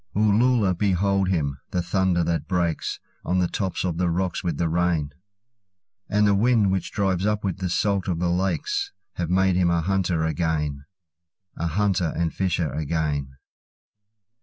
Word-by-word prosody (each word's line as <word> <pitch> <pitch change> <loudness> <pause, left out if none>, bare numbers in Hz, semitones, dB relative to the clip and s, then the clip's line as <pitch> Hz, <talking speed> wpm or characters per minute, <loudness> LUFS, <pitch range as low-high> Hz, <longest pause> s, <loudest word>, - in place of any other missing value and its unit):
Uloola, 105 -1 +3
behold 100 0 +1
him! 70 -7 -1
The 90 - -1
thunder 95 -1 +1
that 85 0 -1
breaksOn 90 0 -2
the 90 - +2
top 95 0 -2
of 85 -3 -2
the 90 -1 +2
rocks 90 +1 -1
with 85 -5 -1
the 85 - +1
rain, 80 -3 0 1.0
And 105 0 +3
the 100 - +4
wind 110 -1 +3
which 95 -1 -2
drives 95 -3 0
up 105 -1 0
with 95 -1 -2
the 95 -1 -2
salt 100 +2 0
of 90 -3 0
the 85 0 0
lakes, 400 - -1 0.2
Have 85 -2 -2
made 95 0 +3
him 90 -1 +3
a 85 -1 +2
hunter 90 -2 0
again—A 80 +2 -4
hunter 90 -1 +1
and 85 -1 -1
fisher 85 -6 -1
again. 75 -3 -2
90 Hz, 155 wpm, -24 LUFS, 85-95 Hz, 1.0 s, the